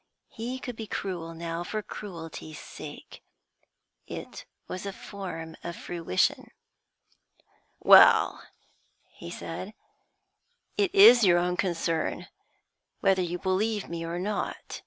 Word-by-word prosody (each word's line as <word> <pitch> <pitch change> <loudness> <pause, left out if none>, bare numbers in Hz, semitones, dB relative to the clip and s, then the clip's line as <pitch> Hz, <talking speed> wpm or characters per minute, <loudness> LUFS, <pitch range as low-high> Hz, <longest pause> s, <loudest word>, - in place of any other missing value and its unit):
He 245 +3 -5
could 245 -2 -6
be 220 -1 -7
cruel 170 -5 -4
now 165 +1 -4
for 215 +4 -4
cruelty's 165 -6 -8
sake; - - -10 0.9
it - - -8 0.2
was 185 +2 -5
a - - -2
form 180 -6 -7
of 170 0 -5
fruition. 165 - -1 1.3
'Well,' - - +7 0.7
he - - -10
said, 185 - -7 1.0
'it 395 -2 +1
is 250 - +9
your 175 -3 +6
own 180 +1 +1
concern 170 -3 -1 0.7
whether 195 -2 +3
you 175 0 -2
believe 200 +3 -1
me 170 -1 -4
or 165 +1 -4
not. 205 +3 -4
180 Hz, 115 wpm, -28 LUFS, 165-210 Hz, 1.3 s, is